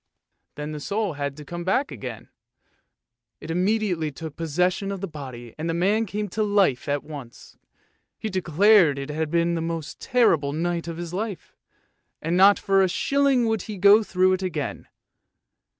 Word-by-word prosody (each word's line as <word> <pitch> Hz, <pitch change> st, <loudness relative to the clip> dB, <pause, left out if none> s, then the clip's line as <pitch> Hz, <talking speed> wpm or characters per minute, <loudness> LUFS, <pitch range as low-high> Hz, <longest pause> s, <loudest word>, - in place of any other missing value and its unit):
Then 150 Hz, +1 st, -5 dB
the 150 Hz, -, -5 dB
soul 200 Hz, +3 st, -2 dB
had 140 Hz, -1 st, -4 dB
to 150 Hz, -, -10 dB
come 175 Hz, +3 st, -6 dB
back 255 Hz, +10 st, 0 dB
again; -, -, -8 dB, 1.1 s
it -, -, -7 dB
immediately 180 Hz, -3 st, 0 dB
took 155 Hz, +1 st, -8 dB
possession 180 Hz, +5 st, 0 dB
of 195 Hz, -, -4 dB
the 195 Hz, -, -4 dB
body, 130 Hz, -7 st, -9 dB
and 165 Hz, +2 st, -2 dB
the 165 Hz, -, -1 dB
man 205 Hz, +6 st, +1 dB
came 210 Hz, +2 st, -3 dB
to 220 Hz, -, -3 dB
life 200 Hz, -12 st, +2 dB
at 145 Hz, 0 st, 0 dB
once. 140 Hz, -6 st, -11 dB, 0.6 s
He -, -, -4 dB
declared 185 Hz, -3 st, +4 dB
that -, -, -3 dB
it 140 Hz, -, -7 dB
had 155 Hz, 0 st, -2 dB
been 170 Hz, +1 st, +1 dB
the 165 Hz, -, -1 dB
most 165 Hz, -2 st, -4 dB
terrible 165 Hz, -, +2 dB
night 170 Hz, +2 st, -2 dB
of 165 Hz, -1 st, -5 dB
his 170 Hz, 0 st, -6 dB
life, 200 Hz, -1 st, -5 dB, 0.6 s
and 165 Hz, +3 st, -1 dB
not 195 Hz, +2 st, +7 dB
for 195 Hz, 0 st, +2 dB
a 190 Hz, -, +3 dB
shilling 275 Hz, +5 st, +2 dB
would 220 Hz, -3 st, 0 dB
he 210 Hz, -, -5 dB
go 200 Hz, +3 st, +7 dB
through 185 Hz, -2 st, +2 dB
it 185 Hz, -, -1 dB
again. 160 Hz, -6 st, -4 dB
175 Hz, 180 wpm, -24 LUFS, 155-200 Hz, 1.1 s, not